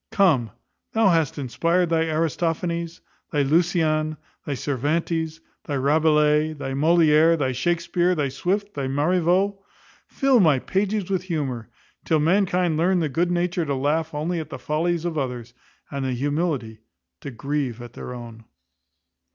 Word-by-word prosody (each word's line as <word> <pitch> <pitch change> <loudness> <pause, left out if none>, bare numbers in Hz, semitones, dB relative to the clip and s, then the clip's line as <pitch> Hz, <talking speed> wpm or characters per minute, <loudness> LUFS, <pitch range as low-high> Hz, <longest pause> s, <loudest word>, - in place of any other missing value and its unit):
Come, 155 - +3 0.4
thou 220 -3 +4
that - - +4
hast 160 -3 +1
inspired 170 +6 0
thy 165 0 +2
Aristophanes, 165 +1 -1 0.3
thy 145 -2 +2
Lucian, 155 0 +1 0.3
thy 145 - -1
Cervantes, 160 +4 -2 0.2
thy 145 - -3
Rabelais, 150 +2 +3
thy 140 -3 -5
Molière, 160 +2 +4
thy 135 -4 0
Shakespear, 175 +6 0
thy 145 -3 0
Swift, 195 +9 -2
thy 140 -2 -3
Marivaux, 180 +7 +1 0.5
fill 270 -3 +3
my 155 -8 +5
pages 195 +6 -1
with 185 -1 -1
humour; 135 - -3 0.3
till 160 - +2
mankind 180 0 +2
learn 180 +3 +2
the 160 -3 0
good 170 +6 0
nature 175 0 0
to 140 -3 -2
laugh 155 +4 0
only 160 +4 -2
at 155 -1 -6
the - - -6
follies 165 +2 -1
of 165 -3 -1
others, 125 -3 -4 0.4
and 140 -1 -3
the 130 -1 -1
humility 140 -4 -2 0.4
to 140 - -7
grieve 135 -1 -3
at 120 -1 -10
their - - -8
own. 115 -2 -9
160 Hz, 150 wpm, -23 LUFS, 140-175 Hz, 0.5 s, my